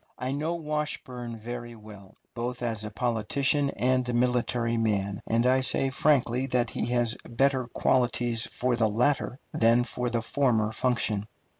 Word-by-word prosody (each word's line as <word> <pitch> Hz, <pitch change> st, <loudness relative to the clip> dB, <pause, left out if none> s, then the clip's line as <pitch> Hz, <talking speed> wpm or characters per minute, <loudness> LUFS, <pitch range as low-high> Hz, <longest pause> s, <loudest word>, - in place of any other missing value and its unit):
I 130 Hz, +1 st, -3 dB
know 155 Hz, +5 st, -1 dB
Washburn 150 Hz, -7 st, -4 dB
very 120 Hz, +1 st, -7 dB
well, 105 Hz, -3 st, -14 dB, 0.2 s
both 125 Hz, +1 st, -4 dB
as 110 Hz, -3 st, -2 dB
a 105 Hz, -, -4 dB
politician 125 Hz, +6 st, 0 dB
and 130 Hz, 0 st, +1 dB
a -, -, -1 dB
military 120 Hz, -1 st, +1 dB
man, 100 Hz, -3 st, -1 dB
and 115 Hz, +2 st, +2 dB
I 130 Hz, +1 st, +4 dB
say 135 Hz, +1 st, +3 dB
frankly 135 Hz, -3 st, +2 dB
that 125 Hz, -3 st, 0 dB
he -, -, -2 dB
has 120 Hz, -2 st, +1 dB
better 130 Hz, +1 st, +1 dB
qualities 120 Hz, -1 st, +1 dB
for 125 Hz, 0 st, -1 dB
the 115 Hz, -2 st, +2 dB
latter 125 Hz, +4 st, 0 dB, 0.2 s
than 115 Hz, +2 st, +4 dB
for 125 Hz, 0 st, -2 dB
the 115 Hz, -1 st, -1 dB
former 115 Hz, -5 st, +1 dB
function. 110 Hz, -3 st, 0 dB
120 Hz, 155 wpm, -27 LUFS, 115-130 Hz, 0.2 s, I